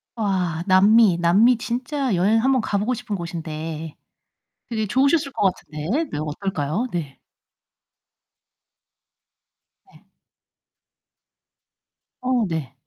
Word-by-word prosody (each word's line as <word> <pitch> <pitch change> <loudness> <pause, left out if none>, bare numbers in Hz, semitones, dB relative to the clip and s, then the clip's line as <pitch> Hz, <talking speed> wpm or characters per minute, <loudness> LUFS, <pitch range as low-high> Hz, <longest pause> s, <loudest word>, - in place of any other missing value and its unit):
와. 185 -7 -1
남미. 200 0 +5
남미 210 +8 +4
진짜 250 +2 -2
여행 205 +6 +3
한번 265 -1 +3
가 205 - -1
보고 215 +5 0
싶은 215 -3 -4
곳인데. 160 -2 -6 0.7
되게 220 -2 -1
좋으셨을 275 - +2
것 195 -6 +2
같은데. 175 - -3
네, - - -4
어떨까요? 155 - -2
네. 155 -6 -5 2.7
네. - - -21 2.2
어 255 -3 +1
네. 150 -6 -4
200 Hz, 175 characters per minute, -22 LUFS, 165-240 Hz, 2.7 s, 남미